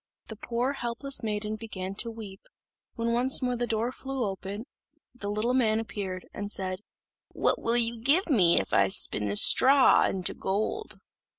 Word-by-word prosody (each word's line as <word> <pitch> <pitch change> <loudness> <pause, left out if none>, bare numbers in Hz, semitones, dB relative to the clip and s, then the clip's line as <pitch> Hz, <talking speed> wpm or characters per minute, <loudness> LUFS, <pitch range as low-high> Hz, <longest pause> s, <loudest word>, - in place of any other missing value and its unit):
The 220 - -6
poor 240 +5 -2
helpless 270 +1 -3
maiden 210 -1 -3
began 195 -4 -6
to 235 - -1
weep, 215 -4 -10 0.5
when 230 -1 -2
once 250 +3 +2
more 250 -1 0
the 240 0 -2
door 230 +2 -1
flew 270 -1 -5
open, 195 +3 -6 0.5
the 210 -5 -7
little 215 +4 -1
man 225 -4 +2
appeared, 195 -5 -6
and 205 0 -6
said, 185 -2 -3 0.5
"What - - 0
will 230 +1 +1
you 230 -1 0
give 295 - +3
me 190 - +4
if 95 - -5
I 95 0 +4
spin 105 +2 0
this 100 0 +6
straw 270 +1 +6
into 185 -2 -2
gold?" 215 - -3
225 Hz, 170 wpm, -27 LUFS, 195-245 Hz, 0.5 s, this